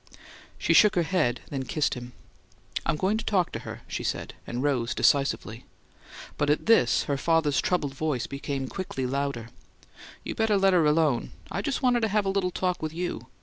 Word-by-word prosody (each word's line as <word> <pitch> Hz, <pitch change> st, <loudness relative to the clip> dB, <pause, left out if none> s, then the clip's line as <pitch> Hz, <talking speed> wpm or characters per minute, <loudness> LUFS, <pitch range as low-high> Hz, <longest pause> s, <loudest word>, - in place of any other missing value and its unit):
She -, -, +1 dB
shook 210 Hz, -2 st, +6 dB
her 175 Hz, -, +3 dB
head, 150 Hz, -9 st, 0 dB
then 135 Hz, -2 st, -2 dB
kissed 150 Hz, +4 st, 0 dB
him. 125 Hz, -1 st, -8 dB, 0.7 s
"I'm -, -, +2 dB
going 190 Hz, +7 st, +1 dB
to -, -, -4 dB
talk 190 Hz, -6 st, +1 dB
to -, -, -4 dB
her," -, -, -8 dB
she -, -, -4 dB
said, -, -, -3 dB
and 120 Hz, +2 st, -3 dB
rose 130 Hz, -4 st, 0 dB
decisively. 135 Hz, -4 st, +1 dB, 0.8 s
But 145 Hz, -, +1 dB
at 150 Hz, -, +1 dB
this, 225 Hz, 0 st, +4 dB
her 140 Hz, -2 st, -1 dB
father's 160 Hz, -1 st, +2 dB
troubled 150 Hz, -7 st, 0 dB
voice 140 Hz, -3 st, -1 dB
became 140 Hz, -1 st, -4 dB
quickly 135 Hz, -6 st, -4 dB
louder: 135 Hz, -3 st, -2 dB, 0.7 s
"You -, -, -4 dB
better 220 Hz, -2 st, +2 dB
let 195 Hz, -1 st, +4 dB
her 165 Hz, -4 st, +4 dB
alone. 150 Hz, -5 st, +1 dB, 0.2 s
I 195 Hz, -, -2 dB
just 275 Hz, +5 st, -2 dB
wanted 245 Hz, -1 st, +4 dB
to 225 Hz, -, +1 dB
have 210 Hz, 0 st, +1 dB
a -, -, +1 dB
little 195 Hz, -2 st, 0 dB
talk 180 Hz, 0 st, -2 dB
with 155 Hz, 0 st, -4 dB
you. 170 Hz, -8 st, -4 dB
155 Hz, 190 wpm, -27 LUFS, 135-190 Hz, 0.8 s, shook